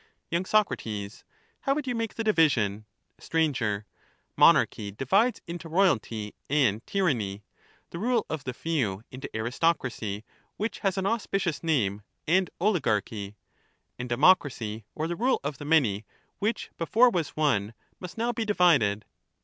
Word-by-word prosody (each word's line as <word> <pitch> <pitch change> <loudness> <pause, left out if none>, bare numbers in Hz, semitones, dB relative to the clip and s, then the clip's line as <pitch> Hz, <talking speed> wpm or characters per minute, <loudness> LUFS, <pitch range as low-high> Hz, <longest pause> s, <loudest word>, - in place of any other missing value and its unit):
y. 170 +1 +1
Soc, 215 +2 +3
How 105 - -5
would 300 -1 -2
you 250 - -1
make 230 -2 -3
the 225 - -2
division? 125 - +2 0.3
Sir, 115 -11 0 0.5
Monarchy 105 - +4
divides 195 - +1
into 170 -1 -7
royalty 115 - +1 0.2
and 125 -7 +2
tyranny; 115 - 0 0.5
the 170 - -6
rule 235 +2 +1
of 155 -4 -4
the 125 - -4
few 120 -13 -1
into 130 +1 -7
aristocracy, 120 -4 -1 0.3
which 215 +3 -3
has 195 -3 0
an 190 - -1
auspicious 195 -7 -1
name, 105 -11 +1 0.3
and 185 +2 +3
oligarchy; 110 - 0 0.6
and 125 0 -5
democracy 120 - +2
or 155 - -2
the 175 - -2
rule 250 +7 +1
of 145 0 -4
the 145 - -7
many, 130 -10 +3 0.4
which 215 +3 -2
before 230 +9 +4
was 165 -7 -2
one, 115 -8 +1 0.2
must 180 +2 -9
now 235 +2 0
be 225 - -2
divided. 165 - +3
155 Hz, 140 wpm, -27 LUFS, -, 0.6 s, Monarchy